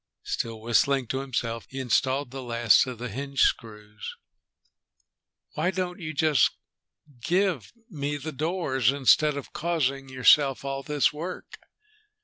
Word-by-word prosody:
Still 115 -1 -4
whistling 125 +4 +2
to 130 - -1
himself, 120 -4 -3
he 135 - -6
installed 130 +1 0
the 135 0 -6
last 120 0 +3
of 125 -2 -6
the 125 +2 -5
hinge 135 +4 -3
screws. 105 -2 -2 1.4
"Why 180 - 0
don't 185 -1 -3
you 160 -3 -5
just 150 -3 +3 0.7
give 175 - 0 0.2
me 145 - -3
the 150 +3 -6
doors, 145 - 0
instead 145 +2 +3
of 140 - -8
causing 140 -5 -1
yourself 135 +2 +4
all 135 0 -3
this 150 0 +1
work?" 170 +5 -7
135 Hz, 130 wpm, -26 LUFS, 125-150 Hz, 1.4 s, yourself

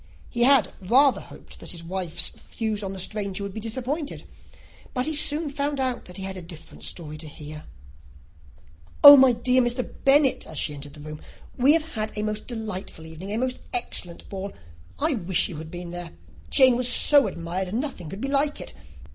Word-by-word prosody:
He 240 -1 +2
had 260 -8 +4
rather 255 +8 +4
hoped - - -14
that - - -11
all - - -2
his 170 -1 -7
wife's 180 -1 -1
views 220 -3 -5
on 195 -2 -4
the 195 - -7
stranger 200 0 -1
would 200 -1 -6
be 220 - -5
disappointed; 260 +7 -4 0.7
but 250 0 0
he 315 - -1
soon 300 +1 +1
found 285 +1 -2
that 250 -9 -3
he 190 - -6
had 190 0 -5
a 185 - -7
very 170 - -14
different 165 -3 -11
story 155 -3 -5
to 160 - -6
hear. 150 0 -10 1.4
"Oh, 285 0 +13
my 265 -2 +7
dear 250 +2 +2
Mr. 245 +1 -1 0.2
Bennet," 275 0 +3
as 160 - -7
she 150 - 0
entered 145 0 -9
the 150 - -13
room, 155 0 -8 0.3
"we 265 +4 +5
have 320 0 0
had 215 -1 -4
a 210 - -1
most 215 0 -4
delightful 210 -8 -6
evening, 160 +5 -8
a 215 - -1
most 255 +1 -2
excellent 180 - -2
ball. 195 0 -6 0.4
I 310 +1 +1
wish 185 -6 +1
you 170 - -7
had 160 +1 -8
been 175 0 -7
there. 175 -1 -7 0.4
Jane 260 -3 +5
was 250 0 +2
so 285 +2 +6
admired, 175 +2 -4
nothing 230 - -4
could 195 +6 -8
be 270 - -2
like 285 +1 0
it. - - -7
215 Hz, 200 wpm, -25 LUFS, 175-260 Hz, 1.4 s, Oh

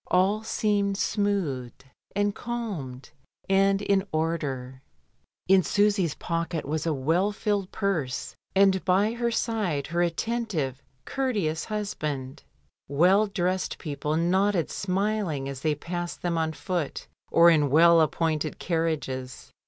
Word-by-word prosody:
All 195 +4 +2
seemed 205 -2 0
smoothed, 175 - -1 0.3
and 205 0 +1
calmed, 200 - -5 0.4
and 195 +1 +3
in 195 -1 +2
order. 140 -5 -2 0.7
In 190 0 +6
Susy's 200 -4 +2
pocket 165 -1 -3
was 155 +3 -2
a - - +2
well 160 +8 +1
filled 205 -2 -1
purse, 175 -12 -2 0.2
and 190 -1 +4
by 195 +4 +2
her 235 0 0
side 215 -11 -1
her 170 +1 -1
attentive, 170 - -1 0.2
courteous 205 - -1
hus 210 -2 -3
band. 135 -3 -4 0.5
Well 180 +9 +4
dressed 185 -1 -1
people 150 0 -3
nodded 185 +1 +1
smiling 195 -7 -1
as 135 -1 -6
they 155 0 +1
passed 175 +3 -5
them 175 -1 0
on 160 -1 0
foot 175 -2 -3 0.3
or 170 0 +7
in 150 -3 +3
well 165 +3 +6
appointed 155 -1 0
carriages. 155 -7 -3
175 Hz, 125 wpm, -26 LUFS, 155-200 Hz, 0.7 s, or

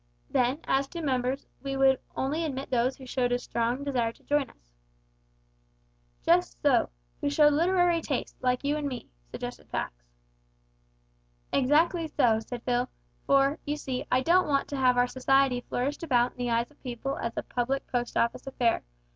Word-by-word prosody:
Then, 255 +5 +1
as 270 +1 +1
to 340 - -6
members, 260 -1 -1 0.2
we 275 -1 -3
would 270 -1 +4 0.2
only 295 +5 -1
admit 275 -3 -4
those 250 +1 +1
who 265 - -11
showed 245 -1 0
a 245 - +3
strong 240 +2 -2
desire 250 -5 0
to - - -25
join 290 -3 +1
us." - - -25 1.5
"Just - - +3
so - - +4 0.3
who - - +1
showed 295 0 +5
literary 350 +1 +3
tastes, 280 -5 -4
like 250 0 +1
you 290 +1 +1
an' 295 -1 -2
me," 255 -3 -6 0.2
suggested - - -7
Pax. - - -2 1.6
"Exactly 320 +5 +3
so," 240 -7 +3
said 235 +2 -7
Phil, 245 0 0 0.4
"for, 275 +2 +3
you 295 0 -2
see, 260 -3 -3
I 255 - +4
don't 355 +6 +4
want 280 -2 +1
to 285 - -3
have 255 -2 +3
our 245 - +5
society 260 0 +2
flourished 260 +4 -2
about 250 -6 +2
in - - -23
the 245 -1 -1
eyes 235 +3 0
of 295 - -26
people 255 +2 -4
as 230 - -3
a - - -1
public 260 +3 -2
Post 245 -1 -2
Office 235 +3 0
affair. 245 -3 +1
265 Hz, 175 wpm, -28 LUFS, 245-285 Hz, 1.6 s, showed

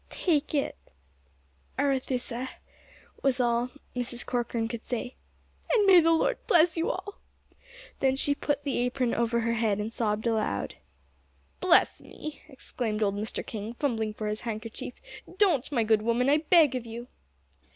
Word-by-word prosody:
"Take 305 -4 0
it, 280 - 0 1.0
Arethusa," 260 -2 -1 0.7
was 270 -2 +2
all 240 0 +2 0.3
Mrs. 245 -1 -3
Corcoran 235 -2 -1
could 230 0 -6
say; 245 +1 -4 0.6
"and 440 -4 +4
may 380 -2 +8
the 330 - +3
Lord 330 +9 +2
bless 335 0 +5
you 330 0 0
all!" 390 +2 -5 0.8
Then 265 -1 +3
she 285 +1 +1
put 290 0 -2
the 275 -4 -1
apron 250 0 0
over 235 0 +1
her 230 0 0
head 220 -3 +1
and 210 +2 -3
sobbed 215 -1 -1
aloud. 225 -2 0 0.9
"Bless 365 -2 +4
me!" 305 -1 -8
exclaimed 230 -5 -2
old 200 -1 +1
Mr. 210 +2 -3
King, 220 +1 -6
fumbling 225 -6 -1
for 215 - -4
his 210 +1 -2
handkerchief, 230 +1 -5 0.4
"don't, 345 - +3
my 240 -5 +2
good 220 -1 +3
woman, 235 +4 +2
I 290 - +5
beg 310 -2 +5
of 250 -2 -4
you." 235 +2 -7
245 Hz, 150 wpm, -28 LUFS, 225-285 Hz, 1.0 s, may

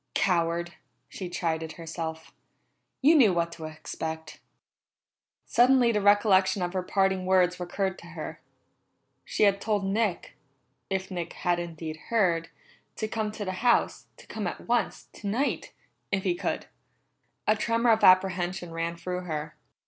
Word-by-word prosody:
"Coward!" 170 -2 +1 0.4
she 185 -2 -6
chided 165 -3 -2
herself. 165 -1 -6 0.7
"You 300 +4 +7
knew 255 -11 +6
what 170 0 0
to 160 -1 -8
expect." 160 0 -6 1.1
Suddenly 245 0 +4
the 210 -2 +1
recollection 205 -2 +4
of 175 +1 -2
her 185 - 0
parting 190 0 +1
words 180 -1 +3
recurred 190 +2 -2
to - - -12
her. - - -7 0.8
She - - 0
had 200 -1 +4
told 210 -3 0
Nick 200 -2 -1 0.6
if 190 0 -2
Nick 175 -2 -4
had 175 -2 0
indeed 165 -2 -6
heard 175 -8 +2 0.5
to 220 - -2
come 215 -1 -2
to 210 -1 -5
the 185 - -2
house, 240 -1 +2
to - - -15
come - - -4
at - - -6
once, - - 0
tonight, 225 +8 -2 0.4
if 195 -1 0
he 185 - +2
could. 175 - -3 0.8
A 215 - +4
tremor 230 +2 +2
of 220 - +2
apprehension 185 -1 +3
ran 165 +1 -3
through 180 +1 -4
her. 155 -2 -4
185 Hz, 145 wpm, -27 LUFS, 170-205 Hz, 1.1 s, You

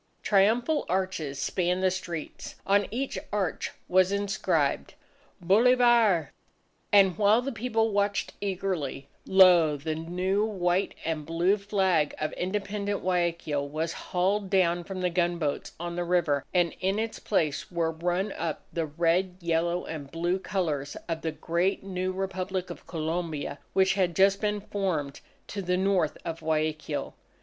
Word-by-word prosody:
Triumphal 230 +9 +3
arches 180 -6 -1
spanned 180 +5 0
the 185 - +4
streets. 180 -4 -6
On 200 0 +3
each 260 +4 -3
arch 200 -4 -1 0.2
was 185 +1 +4
inscribed: 200 0 0 0.5
BOLIVAR! 225 - +4 0.6
And 195 -3 +6
while 215 +4 +4
the 275 - -2
people 225 -1 0
watched 200 0 0
eagerly, 185 -8 -3 0.2
lo, 175 -5 +6
the 155 +3 -3
new 180 +5 -1
white 185 -3 0
and 160 -2 -2
blue 170 +5 +2
flag 190 -7 +1
of 155 - -2
independent 200 +2 -2
Guayaquil 170 -5 -1
was 160 +3 -2
hauled 190 +2 -1
down 175 -3 +2
from 190 -1 -5
the 180 -1 +1
gunboats 170 -4 -1
on 170 0 -4
the 175 - -1
river, 170 -5 +1
and 175 -2 +2
in 190 +2 0
its 220 0 -3
place 155 -8 -1
were 165 -2 0
run 175 +5 -1
up 165 -5 -4
the 165 -2 -1
red, 170 +4 +1
yellow, 170 0 0
and 145 -4 -6
blue 175 +4 -1
colours 155 -8 -2
of 165 -1 -3
the 160 - -2
great 170 +5 -1
new 185 -1 -2
Republic 185 0 -3
of - - -11
Colombia, 160 -3 -3
which 190 0 +4
had 185 -4 0
just 195 +1 +4
been 210 -1 0
formed 180 -9 -2 0.2
to 200 - -5
the 180 -1 0
North 185 -4 +1
of 165 0 -4
Guayaquil. 155 -1 -2
180 Hz, 145 wpm, -28 LUFS, 165-195 Hz, 0.6 s, And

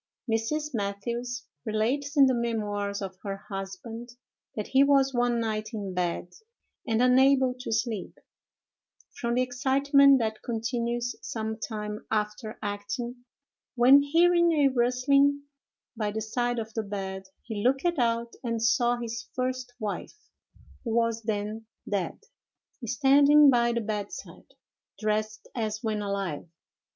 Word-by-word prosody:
Mrs. 280 +7 -1
Mathews 235 +4 -3 0.2
relates 255 +7 -1
in 275 - +8
the 260 - +3
memoirs 205 -4 -2
of 190 -1 -7
her 195 -2 -4
husband, 200 +5 -6 0.5
that 210 - -4
he 270 +1 +5
was 275 -1 +4
one 240 -1 +1
night 220 0 -3
in 200 -3 -4
bed 180 0 -2 0.5
and 225 +1 +2
unable 260 0 +5
to 250 - -5
sleep, 225 -3 -2 1.0
from 235 0 -1
the 255 - +3
excitement 275 +2 +4
that 220 -3 -2
continues 235 +1 -2
some 220 -1 -4
time 210 -2 -5
after 215 +1 -2
acting, 210 +5 -4 0.5
when, 260 +3 +7
hearing 340 +4 +4
a 290 -3 +4
rustling 275 +3 +2 0.5
by 215 -2 -1
the 215 +1 -3
side 240 +3 -1
of 220 -1 -4
the 225 - -1
bed, 195 -2 -5 0.2
he 215 -3 -5
looked 270 +5 +2
out, 235 -1 0
and 230 -2 -2
saw 240 +1 +3
his 230 -2 -5
first 255 -1 -2
wife, 210 - -5 0.7
who 230 -3 -2
was 230 -1 +1
then 215 0 -3 0.2
dead, 195 -5 -2 0.7
standing 280 +3 +6
by 235 -1 +3
the 235 0 -1
bedside, 210 -2 -6 0.4
dressed 215 0 -2
as 215 -1 -3
when 215 -2 -1
alive. 195 -6 -3
230 Hz, 130 wpm, -27 LUFS, 215-255 Hz, 1.0 s, in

